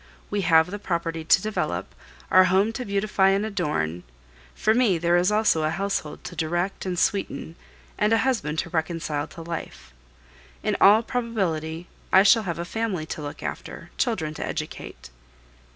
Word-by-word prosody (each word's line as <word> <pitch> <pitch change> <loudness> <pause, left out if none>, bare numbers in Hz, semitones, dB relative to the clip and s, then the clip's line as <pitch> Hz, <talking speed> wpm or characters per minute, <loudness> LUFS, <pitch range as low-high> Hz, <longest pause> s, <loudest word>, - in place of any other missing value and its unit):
We 205 0 0
have 165 0 +4
the 205 - -5
property 165 -4 -2
to 165 - +4
develop, 215 0 -2 0.4
our 185 0 +7
home 195 +4 +2
to 250 +2 -4
beautify 200 -1 +2
and 195 +2 +1
adorn; 150 - -2 0.5
for 215 - +2
me 225 -7 +3
there 170 +1 +2
is 180 +3 +3
also 210 -6 +3
a 155 - +1
household 195 -4 -3
to 180 - -8
direct 175 +4 -2
and 180 -1 -2
sweeten 190 -3 -1 0.4
and 210 +1 +2
a 225 - +5
husband 220 -13 0
to 170 - -12
reconcile 160 -3 -2
to 165 - -10
life. 165 0 -7 0.7
In - - 0
all 210 +3 +7
probability 180 -10 -2 0.3
I 190 - +7
shall 225 +3 +6
have 170 - -2
a 170 - -4
family 205 -5 -2
to 155 - -6
look 145 0 -7
after, - - -7
children 180 - 0
to - - -5
educate. - - -6
180 Hz, 170 wpm, -25 LUFS, 160-210 Hz, 0.7 s, our